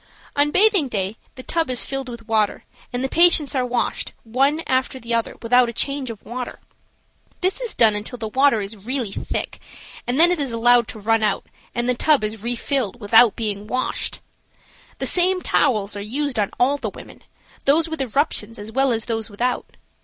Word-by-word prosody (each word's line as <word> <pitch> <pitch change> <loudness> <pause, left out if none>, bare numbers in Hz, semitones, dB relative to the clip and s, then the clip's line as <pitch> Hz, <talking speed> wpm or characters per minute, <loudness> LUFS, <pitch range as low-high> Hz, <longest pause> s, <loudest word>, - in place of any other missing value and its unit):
On 285 +1 +3
bathing 390 -3 +4
day 200 -3 -2 0.2
the 255 - -9
tub 330 0 -1
is 250 -2 +3
filled 270 -1 -4
with 235 -2 -10
water, 215 -2 0 0.3
and 245 +1 -2
the - - +1
patients 325 -2 +5
are 260 -2 +1
washed, 245 -1 -2
one 275 +7 +1
after 260 0 0
the 235 -1 -4
other, 230 -1 -1
without 245 +1 +4
a - - -6
change 275 +1 -1
of 220 -3 -9
water. 245 +1 -6 0.8
This 375 +6 0
is 480 -3 -2
done 225 -2 +5
until 210 +4 -2
the 225 -2 -4
water 265 0 +3
is 200 0 -7
really 245 -3 -1
thick, - - -4 0.5
and 250 +4 0
then 345 +2 +7
it 355 - 0
is 275 -4 -2
allowed 235 0 +4
to 220 - -8
run 225 +2 +1
out 215 - 0 0.3
and 240 0 -1
the 250 - +3
tub 285 0 +2
is 215 0 -3
refilled 240 0 -2
without 225 0 +5
being 210 -2 -3
washed. 255 +3 -2 0.8
The - - -3
same 365 +1 +3
towels 215 - +1
are 205 - -5
used 255 +3 -2
on 205 - +1
all 275 +4 +3
the - - -4
women, - - -13 0.4
those 310 +4 +3
with 320 -3 -4
eruptions 265 -2 -1
as 210 +1 -8
well 270 +2 +2
as 225 -1 0
those 225 -1 -3
without. 240 +5 -2
245 Hz, 195 wpm, -21 LUFS, 220-280 Hz, 0.8 s, then